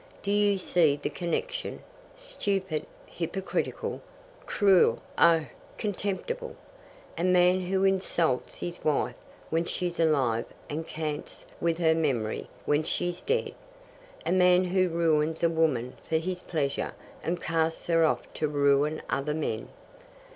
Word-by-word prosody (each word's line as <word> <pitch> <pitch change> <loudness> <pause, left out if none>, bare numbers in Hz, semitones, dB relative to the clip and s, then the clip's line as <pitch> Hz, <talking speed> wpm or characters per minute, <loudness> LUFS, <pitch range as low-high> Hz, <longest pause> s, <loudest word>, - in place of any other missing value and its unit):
Do 200 - -1
you 205 -1 +3
see 170 -5 +3
the - - -3
connection? - - -3 0.3
Stupid, 200 - -2 0.2
hypocritical, 185 +3 -3 0.5
cruel 190 - +4 0.2
oh, 165 -2 +5 0.3
contemptible! 210 - -3 0.6
a - - 0
man 180 0 +4
who 190 +1 +1
insults 180 -8 +1
his 175 0 -6
wife 150 -2 +1 0.4
when 165 +1 +1
she's 175 0 -3
alive 135 -8 +2 0.3
and 160 +2 -3
cants 155 -2 -5
with 165 -1 +1
her 160 -2 +4
memory 135 -9 -1 0.2
when 150 +1 +3
she's 175 +2 -2
dead. 470 +2 0 0.7
A - - 0
man 180 0 +5
who 185 0 +2
ruins 160 -1 +1
a 170 - +5
woman 145 -7 +1 0.2
for 160 - +3
his 180 +2 -3
pleasure, 140 -4 -2 0.3
and 175 +1 -1
casts 160 0 -1
her 165 -1 +3
off 160 - +2
to 155 - -1
ruin 145 +1 +2
other 150 +2 0
men. 115 -8 -3
165 Hz, 130 wpm, -28 LUFS, 155-185 Hz, 0.7 s, oh